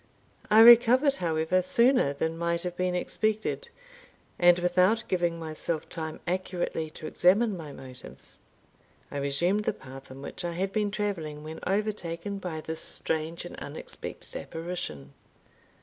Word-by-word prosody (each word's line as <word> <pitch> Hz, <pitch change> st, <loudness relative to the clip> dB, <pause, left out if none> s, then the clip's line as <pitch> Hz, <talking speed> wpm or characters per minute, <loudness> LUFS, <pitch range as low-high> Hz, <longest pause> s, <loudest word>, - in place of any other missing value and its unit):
I 215 Hz, +1 st, +7 dB
recovered, 240 Hz, +4 st, +7 dB
however, 165 Hz, +1 st, +1 dB
sooner 235 Hz, -, +3 dB
than 160 Hz, +3 st, -2 dB
might 170 Hz, 0 st, -1 dB
have 180 Hz, -1 st, -4 dB
been 180 Hz, 0 st, 0 dB
expected, 215 Hz, -, -1 dB, 0.7 s
and 175 Hz, 0 st, +6 dB
without 180 Hz, +6 st, +3 dB
giving 175 Hz, -2 st, 0 dB
myself 160 Hz, 0 st, -3 dB
time 160 Hz, -2 st, -5 dB
accurately 175 Hz, -3 st, -2 dB
to 155 Hz, -, -10 dB
examine 200 Hz, +7 st, +3 dB
my 160 Hz, -4 st, -8 dB
motives. 130 Hz, -2 st, -11 dB, 0.7 s
I -, -, -4 dB
resumed 170 Hz, +9 st, +1 dB
the -, -, +1 dB
path 135 Hz, +1 st, -12 dB
on 135 Hz, +1 st, -10 dB
which -, -, -6 dB
I 175 Hz, -1 st, -2 dB
had 190 Hz, +3 st, -2 dB
been 210 Hz, -1 st, +1 dB
travelling 175 Hz, -8 st, -3 dB
when 160 Hz, +1 st, -7 dB
overtaken 200 Hz, -2 st, -2 dB
by 170 Hz, -4 st, -5 dB
this 160 Hz, +1 st, -4 dB
strange 160 Hz, +1 st, -1 dB
and -, -, -8 dB
unexpected -, -, -8 dB
apparition. 165 Hz, -, -6 dB
175 Hz, 140 wpm, -28 LUFS, 160-205 Hz, 0.7 s, I